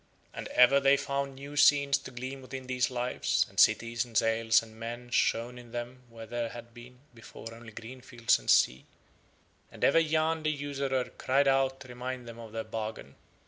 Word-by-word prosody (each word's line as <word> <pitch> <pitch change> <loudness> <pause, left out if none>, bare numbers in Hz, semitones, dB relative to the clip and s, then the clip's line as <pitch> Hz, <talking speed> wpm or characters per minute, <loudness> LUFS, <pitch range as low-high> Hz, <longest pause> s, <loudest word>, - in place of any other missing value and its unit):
And - - -6
ever 125 +3 +5
they 140 0 +4
found 140 -1 -3
new 140 +2 -9
scenes 140 -1 +5
to 135 - -10
gleam 130 +2 -7
within 130 0 -8
these 125 -1 0
Lives, 125 0 0
and - - -6
cities 115 +1 +3
and 120 -3 -4
sails 115 0 +3
and 110 -1 -14
men 120 +2 -7
shone 120 +1 0
in 120 -1 -14
them 120 +1 -6
where 115 -1 -10
there 120 0 -3
had 120 0 -11
been 125 +1 -14
before 115 0 -11
only 115 0 -12
green 120 +4 -10
fields 120 -2 +1
and - - -8
sea, 65 +1 +3 0.8
and - - -10
ever 165 - +5
Yahn 160 0 +1
the 155 - 0
usurer 140 -3 -2
cried 140 +2 +2
out 135 0 +2
to 130 - -10
remind 125 0 -6
them 115 0 -9
of 115 -2 -10
their 110 0 -4
bargain. 110 -10 -6
125 Hz, 190 wpm, -29 LUFS, 115-135 Hz, 0.8 s, ever